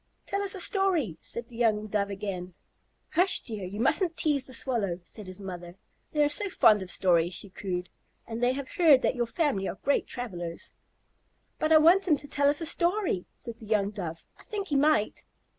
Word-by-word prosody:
"Tell 395 Hz, -, -2 dB
us 400 Hz, 0 st, +2 dB
a -, -, -5 dB
story," 350 Hz, -, +1 dB
said 235 Hz, 0 st, -6 dB
the 235 Hz, -, -14 dB
young 220 Hz, -3 st, +1 dB
Dove 205 Hz, -1 st, -1 dB
again. 190 Hz, -3 st, -5 dB, 0.6 s
"Hush, 360 Hz, +2 st, +4 dB
dear. 215 Hz, -5 st, -6 dB
You 200 Hz, +3 st, -7 dB
mustn't 330 Hz, -, +1 dB
tease 285 Hz, -4 st, +1 dB
the -, -, -13 dB
Swallow," 220 Hz, -9 st, -2 dB
said 205 Hz, +2 st, -9 dB
his 185 Hz, +1 st, -7 dB
mother. 175 Hz, -3 st, -8 dB, 0.4 s
"They 300 Hz, -1 st, +2 dB
are -, -, +4 dB
so 390 Hz, +8 st, +1 dB
fond 215 Hz, -, +5 dB
of 185 Hz, -, -7 dB
stories," 175 Hz, -2 st, +2 dB
she 200 Hz, -, -3 dB
cooed, 180 Hz, -2 st, -4 dB, 0.4 s
"and 230 Hz, +1 st, -6 dB
they 245 Hz, +1 st, +3 dB
have 275 Hz, 0 st, -5 dB
heard 310 Hz, -7 st, +5 dB
that -, -, +2 dB
your 240 Hz, -1 st, -1 dB
family 235 Hz, -, 0 dB
are -, -, -5 dB
great 280 Hz, -, +1 dB
travellers." 175 Hz, -9 st, -6 dB, 0.9 s
"But 310 Hz, -, 0 dB
I 315 Hz, -, +9 dB
want 345 Hz, +5 st, +5 dB
him 305 Hz, -4 st, +4 dB
to 285 Hz, -, -8 dB
tell 285 Hz, 0 st, +2 dB
us 290 Hz, +3 st, +2 dB
a -, -, -2 dB
story," 345 Hz, -, 0 dB
said 235 Hz, -2 st, -7 dB
the 220 Hz, -, -11 dB
young 205 Hz, -2 st, +1 dB
Dove. 170 Hz, -6 st, -6 dB, 0.2 s
"I -, -, -15 dB
think 405 Hz, -3 st, -5 dB
he 290 Hz, -, 0 dB
might." 280 Hz, -6 st, +2 dB
235 Hz, 210 wpm, -28 LUFS, 195-305 Hz, 0.9 s, I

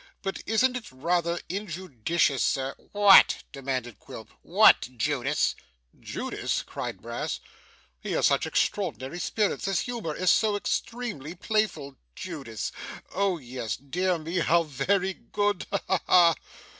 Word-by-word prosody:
But 195 Hz, 0 st, -3 dB
isn't 250 Hz, +4 st, +2 dB
it 245 Hz, -3 st, -6 dB
rather 170 Hz, +5 st, 0 dB
injudicious, 170 Hz, -, -1 dB
sir 135 Hz, 0 st, 0 dB
?' -, -, -30 dB
'What?' 205 Hz, -1 st, +7 dB
demanded 130 Hz, -4 st, -4 dB
Quilp. -, -, -10 dB
'What, -, -, +5 dB
Judas?' 140 Hz, +2 st, +1 dB, 0.5 s
'Judas!' -, -, -3 dB
cried -, -, -6 dB
Brass. -, -, -4 dB, 0.6 s
'He -, -, -4 dB
has -, -, +2 dB
such -, -, +3 dB
extraordinary 130 Hz, +9 st, -1 dB
spirits! 210 Hz, +3 st, -1 dB
His 195 Hz, -4 st, +1 dB
humour 225 Hz, -11 st, -4 dB
is 185 Hz, -1 st, +3 dB
so 215 Hz, -2 st, +3 dB
extremely 205 Hz, -, -3 dB
playful! 175 Hz, -9 st, -1 dB, 0.2 s
Judas! 110 Hz, -3 st, -5 dB, 0.4 s
Oh 195 Hz, -2 st, +1 dB
yes 125 Hz, -6 st, -5 dB
dear 180 Hz, +7 st, -1 dB
me, 165 Hz, +3 st, -3 dB
how 170 Hz, +1 st, +3 dB
very 180 Hz, +7 st, 0 dB
good! 205 Hz, 0 st, -2 dB
Ha 200 Hz, -, 0 dB
ha 190 Hz, -, +2 dB
ha! 170 Hz, -2 st, +6 dB
170 Hz, 130 wpm, -27 LUFS, 135-200 Hz, 0.6 s, What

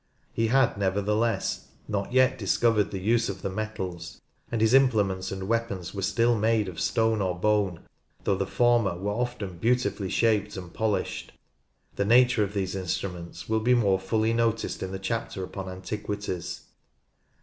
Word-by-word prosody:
He 115 Hz, -, +1 dB
had, 125 Hz, -3 st, +3 dB
nevertheless, 105 Hz, +4 st, 0 dB, 0.2 s
not 100 Hz, +1 st, -2 dB
yet 130 Hz, 0 st, +4 dB
discovered 105 Hz, +1 st, +2 dB
the 95 Hz, -, -4 dB
use 115 Hz, +4 st, +1 dB
of 95 Hz, -1 st, -6 dB
the 95 Hz, -, -2 dB
metals, 95 Hz, -4 st, -5 dB, 0.3 s
and 115 Hz, -, -1 dB
his 110 Hz, +2 st, +3 dB
implements 105 Hz, -8 st, +3 dB
and 95 Hz, -1 st, -5 dB
weapons 110 Hz, -6 st, -2 dB
were 100 Hz, -, -4 dB
still 115 Hz, +4 st, +2 dB
made 110 Hz, -1 st, +2 dB
of 85 Hz, -3 st, -6 dB
stone 110 Hz, -2 st, +1 dB
or 90 Hz, -2 st, -1 dB
bone, 100 Hz, -3 st, +1 dB, 0.4 s
though -, -, +2 dB
the 95 Hz, 0 st, -1 dB
former 120 Hz, -7 st, +2 dB
were 100 Hz, +3 st, -2 dB
often 105 Hz, -6 st, -3 dB
beautifully 115 Hz, -3 st, 0 dB
shaped 105 Hz, -2 st, +1 dB
and 90 Hz, -2 st, -8 dB
polished. 110 Hz, -2 st, -2 dB, 0.6 s
The 100 Hz, -, +1 dB
nature 120 Hz, 0 st, +5 dB
of 100 Hz, +1 st, -4 dB
these 95 Hz, -1 st, -1 dB
instruments 90 Hz, -2 st, -4 dB
will 110 Hz, 0 st, +1 dB
be 125 Hz, +3 st, +3 dB
more 100 Hz, -5 st, +3 dB
fully 110 Hz, +4 st, 0 dB
noticed 115 Hz, -1 st, 0 dB
in 95 Hz, -, -4 dB
the 95 Hz, -, -3 dB
chapter 95 Hz, -1 st, -3 dB
upon 95 Hz, 0 st, -6 dB
Antiquities. 95 Hz, -1 st, -5 dB
105 Hz, 160 wpm, -27 LUFS, 95-115 Hz, 0.6 s, nature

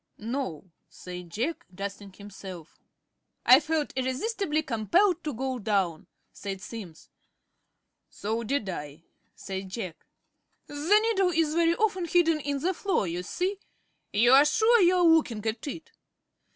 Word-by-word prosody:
"No," 225 Hz, -, -4 dB, 0.3 s
said 180 Hz, -1 st, -9 dB
Jack, 245 Hz, -, -3 dB
dusting 200 Hz, +1 st, -6 dB
himself. 190 Hz, -4 st, -11 dB, 0.7 s
"I 255 Hz, +2 st, +9 dB
felt 310 Hz, -1 st, -2 dB
irresistibly 300 Hz, -, -1 dB
compelled 335 Hz, -, +2 dB
to 300 Hz, -, -2 dB
go 260 Hz, 0 st, -3 dB
down," 195 Hz, -6 st, -1 dB, 0.3 s
said 195 Hz, -1 st, -6 dB
Simms. 185 Hz, -5 st, -10 dB, 1.0 s
"So 220 Hz, +3 st, -3 dB
did 250 Hz, -2 st, -1 dB
I," 150 Hz, -3 st, -6 dB, 0.3 s
said 190 Hz, -1 st, -6 dB
Jack. 185 Hz, -5 st, -7 dB, 0.6 s
"The 310 Hz, +9 st, +3 dB
needle 390 Hz, -5 st, +2 dB
is 325 Hz, -3 st, +1 dB
very 335 Hz, 0 st, +3 dB
often 395 Hz, -4 st, 0 dB
hidden 330 Hz, -2 st, +3 dB
in 285 Hz, -1 st, -2 dB
the 365 Hz, +4 st, +1 dB
floor, 380 Hz, -, 0 dB
you 175 Hz, 0 st, -3 dB
see. 370 Hz, -, -2 dB, 0.5 s
You 235 Hz, +4 st, +4 dB
are 270 Hz, +2 st, +8 dB
sure 445 Hz, +8 st, +4 dB
you 360 Hz, 0 st, +5 dB
are 360 Hz, -, +3 dB
looking 300 Hz, -10 st, +3 dB
at 220 Hz, +4 st, -3 dB
it?" 320 Hz, +3 st, -7 dB
260 Hz, 140 wpm, -27 LUFS, 200-330 Hz, 1.0 s, I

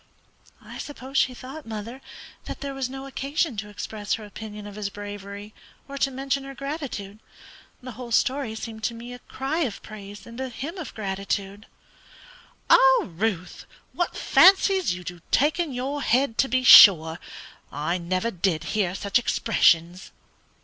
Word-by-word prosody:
"I -, -, -10 dB
suppose 275 Hz, -2 st, -9 dB
she 255 Hz, -, +1 dB
thought, 270 Hz, +3 st, -10 dB
mother, 225 Hz, +4 st, -7 dB, 0.4 s
that -, -, -7 dB
there 280 Hz, -1 st, -4 dB
was 270 Hz, -2 st, -3 dB
no 270 Hz, +1 st, -7 dB
occasion 275 Hz, +1 st, -2 dB
to 210 Hz, +1 st, -5 dB
express 205 Hz, 0 st, -4 dB
her 220 Hz, -, -9 dB
opinion 210 Hz, 0 st, -9 dB
of 205 Hz, -, -9 dB
his 205 Hz, -1 st, -4 dB
bravery 205 Hz, 0 st, -8 dB, 0.3 s
or 280 Hz, -, -8 dB
to 275 Hz, -, +2 dB
mention 270 Hz, +1 st, -2 dB
her 275 Hz, 0 st, -9 dB
gratitude. 275 Hz, -8 st, -6 dB, 0.6 s
The 255 Hz, -, -7 dB
whole 240 Hz, +1 st, -9 dB
story 255 Hz, -1 st, +1 dB
seemed 220 Hz, 0 st, -7 dB
to 235 Hz, -, -2 dB
me 240 Hz, +2 st, -9 dB
a 245 Hz, -, -10 dB
cry 270 Hz, +7 st, -4 dB
of 255 Hz, -12 st, -2 dB
praise 205 Hz, -2 st, -10 dB
and 235 Hz, +2 st, -8 dB
a 260 Hz, -, -3 dB
hymn 300 Hz, -, -6 dB
of 315 Hz, -, -8 dB
gratitude." 200 Hz, 0 st, -4 dB, 1.0 s
"Lord, 265 Hz, -5 st, +5 dB
Ruth, 190 Hz, -5 st, -2 dB, 0.3 s
what 350 Hz, -, -2 dB
fancies 385 Hz, -1 st, +5 dB
you 180 Hz, -, -9 dB
do 175 Hz, -1 st, -8 dB
take 300 Hz, +5 st, +2 dB
in 335 Hz, -4 st, -1 dB
your 265 Hz, +3 st, -3 dB
head, 255 Hz, -1 st, +1 dB
to 270 Hz, -, +4 dB
be 255 Hz, +1 st, 0 dB
sure! 165 Hz, -8 st, +9 dB, 0.5 s
I 155 Hz, +5 st, -2 dB
never 185 Hz, +6 st, -1 dB
did 175 Hz, -4 st, -1 dB
hear 190 Hz, -4 st, 0 dB
such 200 Hz, +4 st, +1 dB
expressions!" 180 Hz, -7 st, +2 dB
230 Hz, 165 wpm, -25 LUFS, 200-270 Hz, 1.0 s, sure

